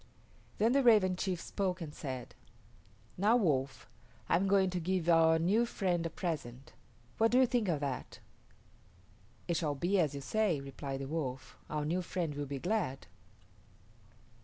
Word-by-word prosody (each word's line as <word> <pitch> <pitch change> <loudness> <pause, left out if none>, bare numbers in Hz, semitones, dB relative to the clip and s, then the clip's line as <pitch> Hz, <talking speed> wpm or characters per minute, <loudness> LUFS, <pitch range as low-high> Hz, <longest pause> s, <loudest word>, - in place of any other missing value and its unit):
Then 225 +3 +3
the 275 +2 +4
Raven 210 -7 +5
chief 180 -1 -2
spoke 185 0 -2
and 155 -4 -7
said, 130 -5 -6 0.9
"Now, 210 +5 +4
Wolf, 140 - 0 0.4
I - - +3
am 190 +3 +2
going 190 -1 +3
to 180 - -2
give 180 0 -1
our 165 -1 +5
new 190 +8 +2
friend 180 -6 -1
a - - -6
present. 140 -8 -5 0.5
What 225 0 +5
do 245 - +3
you 260 - +6
think 240 -4 0
of 155 -5 0
that?" 135 -3 -4 1.3
"It 170 - 0
shall 150 -3 -1
be 180 +7 +1
as 150 -5 +1
you 140 - -5
say," 205 -1 0
replied 135 0 -6
the 135 - -4
Wolf; 135 -4 -4
"our 150 -1 -2
new 175 +4 0
friend 170 -3 -3
will 145 0 -4
be 140 0 -4
glad." 180 -3 -2
170 Hz, 165 wpm, -32 LUFS, 145-195 Hz, 1.3 s, you